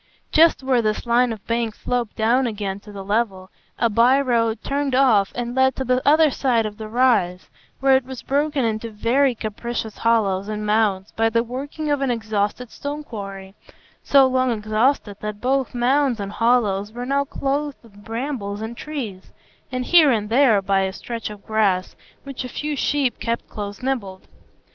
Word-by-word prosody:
Just 320 -3 +4
where 260 -2 +2
this 215 +1 -1
line 240 +1 +3
of 215 -3 -8
bank 230 -2 -1
sloped 245 -3 -2
down 240 +4 +2
again 200 -3 -4
to 210 +1 -13
the 200 -1 -7
level, 200 -3 -1 0.3
a 235 - +2
by 235 +5 +4
road 230 -4 0
turned 280 -1 -1
off 225 -7 +4
and 240 0 -3
led 265 0 +3
to 265 - -3
the 255 0 +1
other 310 0 +5
side 240 -5 +1
of 210 -1 -5
the 220 -1 -7
rise, 225 -7 +1 0.3
where 270 0 +5
it 265 - +2
was 260 -1 -8
broken 285 -1 0
into 225 +1 -2
very 240 +5 +1
capricious 220 0 -5
hollows 205 -4 +1
and 210 0 -4
mounds 210 -2 +1
by 225 0 +1
the 230 +1 +1
working 285 +5 -4
of 290 -1 0
an 275 - 0
exhausted 220 0 -2
stone 290 +1 -5
quarry, 195 -6 -8 0.5
so 275 -1 +5
long 255 0 +1
exhausted 215 0 0
that 210 -1 -5
both 260 0 0
mounds 255 0 +2
and 200 0 -4
hollows 215 -3 +1
were 245 +2 -6
now 280 +2 +1
clothed 280 +1 -2
with 205 -3 -17
brambles 225 -3 -4
and 220 +2 -5
trees, 240 -12 -6 0.4
and 255 0 -2
here 330 -2 +6
and 215 -4 0
there 235 -6 +4
by 195 0 +2
a 190 0 0
stretch 230 +3 -6
of 210 -1 -11
grass 200 -4 +1 0.3
which 275 -2 -6
a 250 - -6
few 300 +4 -3
sheep 280 -2 0
kept 230 0 -3
close 205 +1 -7
nibbled. 205 -8 -3
235 Hz, 180 wpm, -22 LUFS, 210-265 Hz, 0.5 s, here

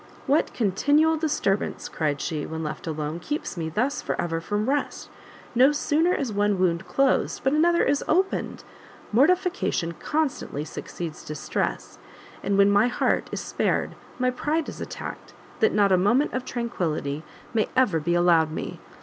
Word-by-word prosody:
"What 290 +2 +2
continual 285 +10 +2
disturbance," 290 -11 -1
cried 150 -3 -1
she, 155 -4 -2
when 160 0 -4
left 150 +1 -5
alone, 155 +1 -3
"keeps 295 - -4
me 165 -2 -3
thus 245 - -1
for - - -3
ever 165 -1 -1
from 210 +5 -2
rest! 285 +1 -1 0.4
no 255 +4 +6
sooner 305 +3 +2
is 260 -10 -1
one 205 0 +2
wound 175 -1 +1
closed, 275 -1 +1
but 270 - +2
another 340 +3 +4
is 285 +1 +1
opened; 380 +4 0 0.5
mortification 340 - +2
constantly 290 - -2
succeeds 160 0 -7
distress, 145 - -3 0.4
and 200 0 0
when 200 0 +6
my 205 +3 +4
heart 245 - 0
is - - -3
spared; - - -1 0.2
my 255 0 +1
pride 300 +5 -1
is - - -7
attacked, - - -7 0.3
that 445 - +4
not 200 -2 +3
a 185 - +6
moment 235 +11 +2
of 255 0 -2
tranquility 160 - -2 0.3
may 220 -2 +1
ever 250 -11 +3
be 170 +3 0
allowed 170 -2 +4
me! - - -5
210 Hz, 160 wpm, -25 LUFS, -, 0.5 s, no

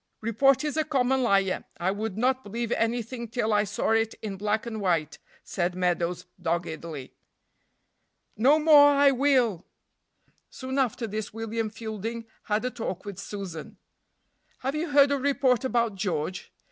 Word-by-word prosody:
"Report 265 +5 +3
is 300 0 -2
a 315 - +3
common 265 -3 +1
liar; 195 -5 +2 0.2
I 180 +2 +1
would 205 0 -4
not 260 +3 +1
believe 230 +3 -4
anything 235 +1 -1
till 225 -1 -1
I 205 0 +3
saw 205 +2 -1
it 225 0 +1
in 205 -3 -4
black 210 +3 -1
and 220 -2 -5
white," 165 -6 0 0.2
said 175 -1 -2
Meadows, 175 -1 -1 0.2
doggedly. 165 -4 -4 1.2
"No 270 +8 +5
more 300 -2 +7
I 280 -1 +5
will." 255 - +2 0.9
Soon 260 +1 -4
after 250 -2 0
this 215 0 -5
William 225 0 -3
Fielding 225 +1 -6 0.2
had 215 +3 0
a 250 - -1
talk 190 -6 -5
with 200 -2 -7
Susan. 195 -5 -7 0.8
"Have 270 +2 -2
you 310 +2 -2
heard 285 -1 +5
a 280 - +1
report 265 -3 +2
about 235 -4 +1
George?" 185 -3 -3
225 Hz, 150 wpm, -27 LUFS, 195-260 Hz, 1.2 s, more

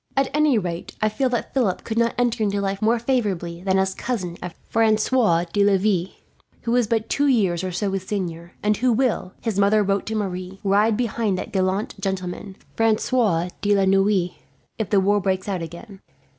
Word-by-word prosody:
"At 275 -1 +2
any 300 -4 +3
rate, 175 -4 -4
I 215 - +2
feel 260 +5 0
that 240 -1 -3
Philip 220 -9 0
could 225 0 -2
not 235 0 +1
enter 240 -2 +1
into 200 -1 0
life 195 0 -2
more 225 +2 +3
favourably 205 -9 -1
than 190 0 +1
as 190 0 +1
cousin 190 -7 -3
of 175 -2 -6
Francois 220 -5 +2
de 205 - +3
Laville; 195 -2 +2 0.5
who 235 0 0
is 245 -3 +2
but 225 0 0
two 285 +1 +1
years 190 -9 +2
or 185 - -2
so 195 +3 -1
his 190 -1 -4
senior, 175 -4 -4
and 210 0 +2
who 250 +2 +2
will, 230 -6 0
his 220 -4 -2
mother 205 +1 +4
wrote 195 0 -1
to 220 - -2
Marie, 190 -2 -4
ride 205 +2 +3
behind 230 -4 0
that - - -5
gallant 190 +2 0
gentleman, 190 0 -4 0.2
Francois 220 -5 +2
de 205 0 +3
la 195 -1 +3
Noue, 195 -2 +2 0.5
if 220 - -2
the 200 - +4
war 205 +2 +2
breaks 190 0 -1
out 190 -3 -2
again. 175 +5 -9
200 Hz, 195 wpm, -23 LUFS, 185-225 Hz, 0.5 s, mother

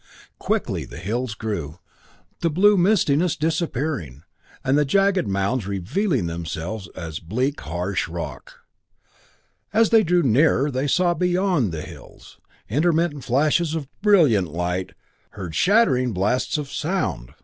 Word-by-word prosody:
Quickly - - -1
the - - -11
hills 110 +6 -3
grew, 95 -10 -4 0.6
the 170 - +1
blue 200 +6 +4
mistiness 175 -4 +2
disappearing, 150 - -2 0.4
and 130 - +2
the 150 - +4
jagged 195 +5 +2
mounds 100 +3 -1
revealing 115 - -1
themselves 85 +4 -5
as 80 -4 -6
bleak 125 - -2
harsh 90 +4 -2
rock. 80 -5 -8 1.1
As 220 +1 +3
they 225 -1 +6
drew 175 -1 +2
nearer 140 +3 +3
they 130 +2 -1
saw 175 +4 +2
beyond 180 - +1
the 80 -2 -5
hills, - - -13 0.3
intermittent 155 +2 0
flashes 155 +5 +1
of 150 -4 -4
brilliant 155 - +4
light, 90 +3 -3 0.4
heard 90 -5 -6
shattering 130 - +3
blasts 105 +11 0
of 145 -2 -5
sound. 145 - -2
130 Hz, 125 wpm, -23 LUFS, -, 1.1 s, they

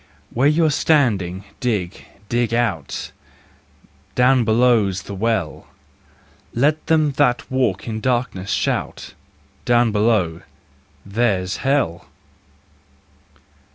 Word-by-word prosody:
Where 130 +4 +3
you're 155 +1 +3
standing, 105 - +1 0.2
dig, 100 -7 -2 0.2
dig 120 0 0
out: 100 -12 -2 1.0
Down 125 0 +4
below's 110 -5 +2
the 100 - -8
Well: 100 -5 -2 0.9
Let 150 +6 +1
them 155 -2 +3
that 125 -4 +1
walk 120 -7 0
in 110 -1 -3
darkness 120 -6 -1
shout: - - -2 0.3
" - - -35
Down 120 -1 +3
below—there's 100 0 -2
Hell! 135 - -1
115 Hz, 90 wpm, -20 LUFS, 100-125 Hz, 1.0 s, Down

